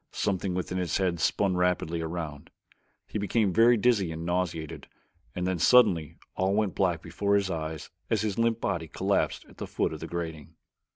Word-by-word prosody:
Something 95 -2 -1
within 90 0 -2
his 90 -3 0
head 90 -3 0
spun 95 +2 +1
rapidly 90 -2 0
around. 80 -3 -5 0.6
He 105 - -3
became 100 -1 +1
very 115 +3 +6
dizzy 105 -6 +2
and 80 +1 -5
nauseated 85 -3 -2 0.5
and 90 - -2
then 90 -2 -1
suddenly 95 - +4 0.2
all 95 +1 +1
went 105 -4 +1
black 90 -4 0
before 100 +4 0
his 100 -2 +1
eyes 80 -2 -5 0.2
as - - +1
his 105 0 -2
limp 115 -1 +2
body 80 -6 -2
collapsed - - 0
at - - -18
the - - -5
foot - - -1
of - - -6
the - - -6
grating. 80 -3 -6
90 Hz, 180 wpm, -28 LUFS, 85-100 Hz, 0.6 s, very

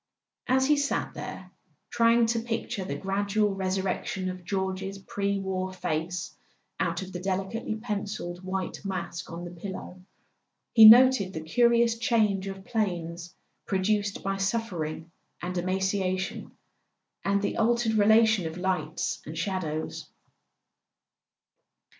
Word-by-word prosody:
As 260 +1 +3
he 295 +2 +4
sat 285 0 -1
there, - - -8 0.4
trying 230 0 +4
to 230 +1 +1
picture 225 -4 -3
the 185 - -4
gradual 200 +1 0
resurrection 190 -1 -2
of 185 -1 -9
George's 190 +1 -3
pre 200 +1 -2
war 190 -1 -2
face 175 0 -3 0.4
out - - -1
of 190 - -9
the 180 - -4
delicately 195 +4 -2
pencilled 200 -5 -4
white 185 0 -4
mask 185 -2 -4
on 170 +1 -6
the 175 - -7
pillow, 185 0 -8 0.7
he 220 -2 +11
noted 240 -5 +7
the 160 - -3
curious 235 +6 +3
change 215 -5 +2
of 195 0 -7
planes 175 -6 -3 0.3
produced 200 +1 0
by 195 0 -1
suffering 180 -6 -2 0.3
and 180 +1 -3
emaciation, 190 +1 -1 0.7
and 200 0 +1
the - - -1
altered 235 0 +2
relation 220 -3 +4
of 160 +2 -7
lights 180 -3 -2
and 160 +2 -6
shadows. 160 -3 -3
195 Hz, 125 wpm, -27 LUFS, 185-215 Hz, 0.7 s, he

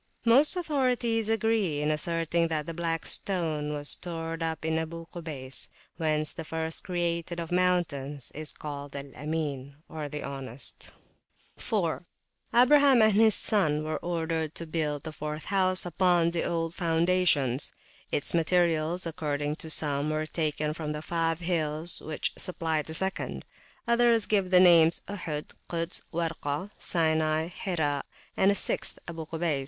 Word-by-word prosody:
Most 270 +9 +5
authorities 250 - +1
agree 220 -8 +1
in 150 +1 +1
asserting 165 +1 0
that 155 -2 -2
the 165 - -5
Black 165 -1 -2
Stone 160 -6 -2
was 145 -1 -3
stored 165 -1 -3
up 160 -1 -2
in 160 0 +1
Abu 165 +1 -5
Kubays, 150 -7 -2 0.3
whence 155 -2 +1
that 165 - -7
first 160 0 -3
created 170 -1 -2
of 165 0 -5
mountains 155 -7 0
is 155 +1 -4
called 145 -2 -7
Al 140 0 -7
Amin, 145 -2 -3
the 150 -1 -5
Honest. 135 -3 -5 0.6
4. - - -1 0.5
Abraham 265 0 +6
and 215 -1 +5
his 220 +1 +5
son 155 -8 +1
were 155 -1 -2
ordered 165 -2 -2
to 165 - -5
build 155 -3 -2
the 160 - -5
fourth 150 0 -5
house 185 -1 +2
upon 175 -1 +3
the 170 -1 -1
old 165 -1 -1
foundations: 165 -6 +3 0.4
its 145 - +2
materials, 170 0 +2
according 150 -3 -2
to 160 - -6
some, 145 -1 +2
were 155 0 -1
taken 155 -1 -1
from 155 -1 -4
the 150 0 -5
five 165 0 -1
hills 165 -1 0
which 155 -1 -3
supplied 160 -4 -1
the 160 - -4
second; 190 +2 -2 0.4
others 235 -2 +4
give 195 -3 +1
the 180 -1 +6
names 170 -2 +6
Ohod, 165 -7 -5 0.2
Kuds, 170 0 0
Warka, 165 +1 -2
Sinai, 160 -1 +1
Hira, 155 -7 -1 0.3
and 190 - +4
a 200 - +3
sixth, - - -2
Abu 165 -2 -6
Kubays. 160 -3 -1
165 Hz, 145 wpm, -28 LUFS, 150-180 Hz, 0.6 s, Abraham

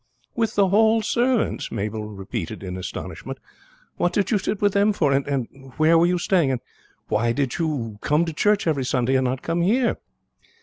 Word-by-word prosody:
"With 225 -1 0
the 200 -2 +3
Hall 220 +2 +4
servants!" 240 +1 0
Mabel 105 +1 -3
repeated 100 -1 -6
in 90 -1 -5
astonishment. 95 - -6 0.6
"What 175 - +1
did 200 +3 0
you 210 - +3
sit 195 - -2
with 205 -1 +2
them 205 +1 +3
for? 150 -8 +1
and 135 -1 -3
where 155 +2 +4
were 165 +1 +5
you 180 0 +1
staying? 175 -4 +2
and 130 -3 -1 0.5
why 115 +2 +1
did 135 +1 -2
you 125 -10 -2
come 150 +3 +2
to 165 - -3
the - - -14
church 205 +5 +2
every 150 -5 +1
Sunday 125 0 0
and 130 0 +2
not 130 +1 -2
come 170 +1 -1
here?" 235 +7 +2
155 Hz, 190 wpm, -23 LUFS, 130-200 Hz, 0.6 s, were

